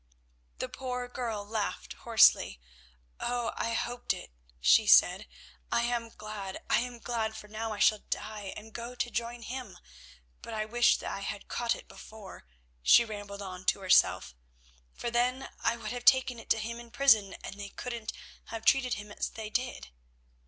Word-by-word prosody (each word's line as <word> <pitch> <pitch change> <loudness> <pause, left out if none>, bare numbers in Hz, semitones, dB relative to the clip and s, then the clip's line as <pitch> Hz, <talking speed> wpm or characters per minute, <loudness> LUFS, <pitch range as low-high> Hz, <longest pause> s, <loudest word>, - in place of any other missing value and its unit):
The - - -3
poor 250 -1 -4
girl 230 -5 -4
laughed 205 - -3
hoarsely. 65 - +4 0.6
"Oh! 240 -1 -1
I 230 - -1
hoped 245 +1 -1
it," - - -10 0.3
she - - +5
said. - - +6 0.4
"I 235 - +2
am 235 -1 -1
glad, 210 -3 -7
I - - +5
am 245 0 -4
glad, 225 -2 -2
for 215 -1 -9
now 220 +1 -4
I 210 - -4
shall 215 +1 +4
die 210 -2 -4
and 220 +1 -11
go 240 +1 -6
to 240 -1 -2
join 235 0 -3
him. 255 +2 -6 0.6
But 230 - -7
I 215 0 -1
wish 240 +2 +4
that - - -5
I - - -4
had 200 0 -5
caught 235 -1 0
it - - -12
before," 210 - -12 0.3
she 235 - +7
rambled 205 -2 -7
on 185 -1 -7
to 195 - +2
herself, 185 - +4 0.6
"for 235 - -4
then 250 +2 +1
I 235 - +1
would 215 -2 -5
have 245 0 -5
taken 260 -2 +5
it - - -13
to - - +4
him 230 +2 -4
in 240 0 -11
prison 230 -6 +4
and 200 - -7
they 200 0 -6
couldn't 235 -1 -5 0.3
have 225 -1 -7
treated 260 -2 +4
him 210 0 -9
as - - -3
they 220 -1 -7
did." 250 - -2
225 Hz, 180 wpm, -30 LUFS, 210-240 Hz, 0.6 s, she